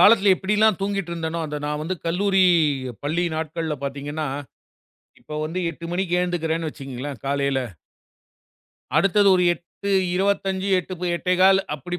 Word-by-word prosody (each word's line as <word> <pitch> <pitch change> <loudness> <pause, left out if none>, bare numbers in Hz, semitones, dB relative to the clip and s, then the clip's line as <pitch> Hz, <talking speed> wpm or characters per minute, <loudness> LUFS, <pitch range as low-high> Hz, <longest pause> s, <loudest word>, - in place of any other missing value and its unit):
காலத்துல 205 -2 +7
எப்டில்லாம் 210 0 +2
தூங்கிட்டு 195 -3 -2
இருந்தேனோ, 165 0 -3
அத 150 0 -4
நான் 150 0 -2
வந்து 175 +4 -2
கல்லூரி, 190 +2 +3 0.6
பள்ளி 170 +4 0
நாட்கள்ல 160 0 -3
பார்த்தீங்கன்னா, 145 +3 -4 0.9
இப்ப - - -12
வந்து 165 +4 -3
8:00 170 +1 -11
மணிக்கு 180 -1 0
எந்துக்கிறேன்னு 165 -2 -1
வச்சுக்கோங்களேன் 135 -2 -7
காலையில. 140 -1 +1 1.4
அடுத்தது 200 +1 +4
ஒரு 180 -1 +3
8:25, 190 +2 -1
8:00, 185 +1 -5 0.2
8:15 185 +2 +4 0.2
அப்டி 175 +6 -5
175 Hz, 120 wpm, -23 LUFS, 155-195 Hz, 1.4 s, காலத்துல